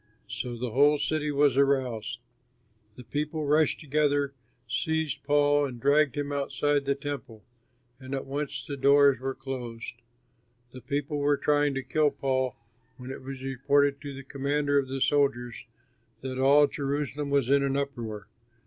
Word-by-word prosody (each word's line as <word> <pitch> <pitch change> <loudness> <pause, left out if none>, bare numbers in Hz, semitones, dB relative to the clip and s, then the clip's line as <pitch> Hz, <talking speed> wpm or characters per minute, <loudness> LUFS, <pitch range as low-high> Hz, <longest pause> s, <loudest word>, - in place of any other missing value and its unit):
So 120 +4 -5
the 120 0 -4
whole 145 +4 +4
city 150 0 -1
was 145 -1 +3
aroused. 130 -5 0 0.7
The 125 - -11
people 150 +4 -3
rushed 150 +1 +2
together, 145 -1 +1 0.3
seized 160 +4 -1
Paul, 145 0 +3
and 125 -3 -8
dragged 145 +2 +3
him 145 0 -2
outside 145 0 0
the 140 0 +1
Temple; 140 -6 -7 0.6
and 130 0 -5
at 135 - -4
once 140 +2 -4
the 140 - -5
doors 140 -1 +5
were 135 +1 -3
closed. 125 -4 -6 0.8
The 130 - -10
people 145 +2 -2
were 145 0 +2
trying 145 -1 +2
to 135 - -2
kill 150 +3 +2
Paul 130 -3 -1 0.4
when 125 +1 -8
it - - -7
was 130 0 -8
reported 140 +2 +1
to 140 -2 -7
the 135 - -8
commander 145 +1 0
of 135 - -2
the 135 0 -4
soldiers 120 -5 0 0.5
that 130 0 -5
all 140 +2 +6
Jerusalem 145 0 -3
was 140 -2 +1
in 140 0 +5
an 140 0 0
uproar. 115 -7 -4
140 Hz, 160 wpm, -27 LUFS, 130-145 Hz, 0.8 s, all